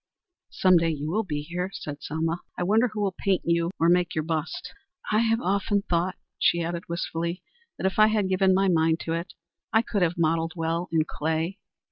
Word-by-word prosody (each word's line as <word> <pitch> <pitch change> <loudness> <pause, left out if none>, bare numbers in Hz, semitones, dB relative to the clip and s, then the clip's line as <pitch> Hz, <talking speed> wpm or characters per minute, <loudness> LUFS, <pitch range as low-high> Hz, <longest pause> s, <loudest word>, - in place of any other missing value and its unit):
"Some 185 -2 +4
day 165 0 +2
you 150 0 -3
will 215 +5 +1
be 150 -8 -3
here," 175 +4 -3
said 145 -1 -6
Selma. 165 +3 -2 0.2
"I - - -1
wonder 220 +6 +3
who 215 -2 -5
will 195 -2 0
paint 195 -2 +1
you 170 0 +2
or 165 - +4
make 175 0 +3
your 155 - 0
bust. 160 0 -3 0.4
I 215 - +4
have 225 0 +2
often 200 0 0
thought," 175 +1 0 0.2
she 170 0 +3
added, 170 +1 -4
wistfully, 170 +1 -3 0.3
"that, - - -4
if 190 +2 0
I 215 - +8
had 215 -3 +1
given 190 0 +3
my 195 +1 +3
mind 165 -2 +3
to 165 - -2
it, 170 +1 -4 0.4
I 220 +1 +4
could 205 -4 -2
have 175 -1 +1
modelled 165 0 +1
well 165 +1 -2
in 160 -2 +2
clay. 160 +5 -2
170 Hz, 205 wpm, -26 LUFS, 165-190 Hz, 0.4 s, I